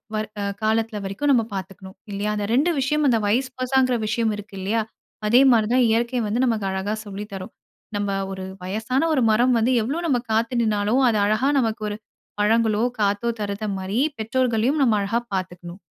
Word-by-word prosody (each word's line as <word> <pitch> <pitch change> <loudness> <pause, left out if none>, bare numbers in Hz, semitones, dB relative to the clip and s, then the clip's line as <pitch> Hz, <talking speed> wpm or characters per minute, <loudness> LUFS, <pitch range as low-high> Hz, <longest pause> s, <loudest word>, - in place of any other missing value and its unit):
வர் 215 0 -2
அ - - -2 0.2
காலத்தில 220 0 0
வரைக்கும் 195 +10 0
நம்ம 240 -4 +4
பார்த்துக்ணும், 190 0 -8 0.2
இல்லையா? 205 +1 -2
அந்த 205 -1 -2
2 290 +8 +3
விஷயம் 300 +3 +1
அந்த 235 - +4
வயஸ் 255 +5 +1
வெர்ஷங்கிற 255 -1 +2
விஷயம் 225 0 0
இருக்கு 205 -1 -10
இல்லையா? 215 +4 0 0.5
அதே 240 +4 +6
மாரி 220 -3 +3
தான் 255 -1 +4
இயற்கை 235 +2 +1
வந்து 230 +5 0
நமக்கு 220 -4 0
அழகா 190 +2 -2
சொல்லி 205 0 -6
தரும். 185 -1 -7 0.4
நம்ப 205 -1 -1 0.2
ஒரு 190 0 -6 0.2
வயசான 220 - -1
ஒரு 265 - +2
மரம் 245 +4 +3
வந்து 240 +3 +2
எவ்ளோ 275 +10 -2
நம்ம 250 -5 +2
காத்து 230 +3 +1
நின்னாலும், 215 +3 +1
அது 220 - +1
அழகா 215 +7 +2
நமக்கு 225 -2 -1
ஒரு 205 - -5 0.4
பழங்களோ, 220 +1 +2 0.2
காத்தோ 205 +3 +1
தருகிற 200 +1 -4
மாரி, 190 +5 -2 0.2
பெற்றோர்களையும் 250 +4 +1
நம்ம 225 -4 +3
அழகா 205 +4 0 0.2
பார்த்துக்கணும். 180 -1 -6
220 Hz, 175 wpm, -23 LUFS, 205-245 Hz, 0.5 s, அதே